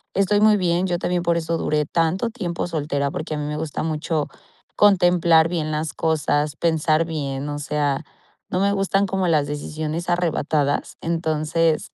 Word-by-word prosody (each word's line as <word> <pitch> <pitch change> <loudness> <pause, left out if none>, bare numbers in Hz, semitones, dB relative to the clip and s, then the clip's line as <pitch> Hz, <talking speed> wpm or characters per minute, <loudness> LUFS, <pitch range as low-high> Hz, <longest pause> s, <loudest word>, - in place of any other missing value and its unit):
estoy 205 +1 +2
muy 215 -1 +6
bien, 180 0 +1
yo 175 -1 0
también 180 0 0
por 170 0 +2
eso 165 0 -1
duré 150 -2 0
tanto 170 +8 0
tiempo 175 -7 -3
soltera, 145 -3 -2
porque 155 0 -4
a - - -4
mí 150 - -3
me 150 0 -3
gusta 155 -1 -3
mucho 155 -1 -1 0.5
contemplar 175 -5 +5
bien 155 -3 -2
las 155 0 -2
cosas, 150 -2 0
pensar 160 -1 +2
bien, 140 -3 -4
o 145 - -4
sea, 145 -1 -1 0.5
no 180 - -1
me 200 +1 +2
gustan 195 0 +1
como 190 -1 -1
las 150 -4 +2
decisiones 155 +3 -4
arrebatadas, 155 -4 0
entonces, 160 -1 0
160 Hz, 165 wpm, -22 LUFS, 150-175 Hz, 0.5 s, muy